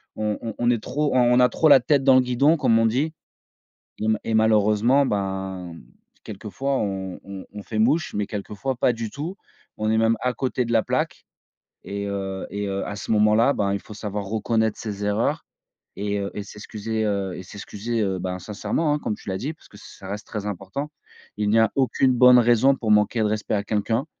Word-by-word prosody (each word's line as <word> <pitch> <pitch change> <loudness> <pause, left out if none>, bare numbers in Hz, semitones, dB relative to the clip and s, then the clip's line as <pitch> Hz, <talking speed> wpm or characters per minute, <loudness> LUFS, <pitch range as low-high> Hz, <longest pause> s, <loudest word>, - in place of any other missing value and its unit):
on 105 -1 -1
on 115 -2 -5
on 120 0 +1
est 115 -3 0
trop 145 -2 -1
on - - +5 0.2
on - - +5
a 125 - +6
trop 160 - +2
la 140 -2 +9
tête 140 +2 +2
dans 135 -1 +6
le 130 - +6
guidon 135 +6 +3
comme 115 -6 +3
on 115 - +4
dit 145 +8 0 0.9
et 110 - -2
ma 110 -1 +2
et 110 - -2
malheureusement, 110 +5 +4
ben, 95 -3 -3 0.5
quelquefois 110 +7 -3
on 95 -2 -3
on 100 -1 -8
on 105 -1 -7
fait 110 -1 -2
mouche 145 +9 +2
mais 100 -1 -1
quelquefois 105 +5 -4
pas 125 - +2
du 115 -2 -5
tout. 160 +7 -5 0.4
On 110 0 -1
est 110 - +2
même 115 0 +3
à 125 0 0
côté 130 -1 -1
de 115 - -3
la 115 -1 +4
plaque - - -2 0.6
et, 100 0 -4
heu, 95 -1 -4
et, 100 +1 -3
heu, 100 0 -2
à 100 - -5
ce - - -8
moment-là, 110 +4 +4
ben 100 -1 0
il 100 - -1
faut 105 - -11
savoir 105 -1 -4
reconnaître 110 +1 0
ses 105 -2 -5
erreurs 105 +2 0 0.5
et 100 0 -2
heu 100 0 -3
et 105 - -5
s'excuser, 110 +2 -5
heu, 100 -2 -1
et 90 - -7
s'excuser, 105 +4 -4
heu, 95 -2 0
ben, 90 0 -3
sincèrement, 110 - -1
hein, 150 - -1
comme 105 - -2
tu - - -17
l'as 95 - -1
dit 145 +9 -4
parce 160 - -21
que 105 - -15
ça 95 - -12
reste 105 +2 -5
très 105 -2 -5
important. 100 +9 -4 0.5
Il 105 -1 0
n'y 115 +1 +4
a 110 - +4
aucune 130 0 +2
bonne 125 0 +7
raison 120 +3 +4
pour 110 -4 -1
manquer 105 +2 +3
de - - +2
respect 105 0 -1
à 100 - -1
quelqu'un. 110 +5 -1
110 Hz, 220 wpm, -23 LUFS, 100-125 Hz, 0.9 s, la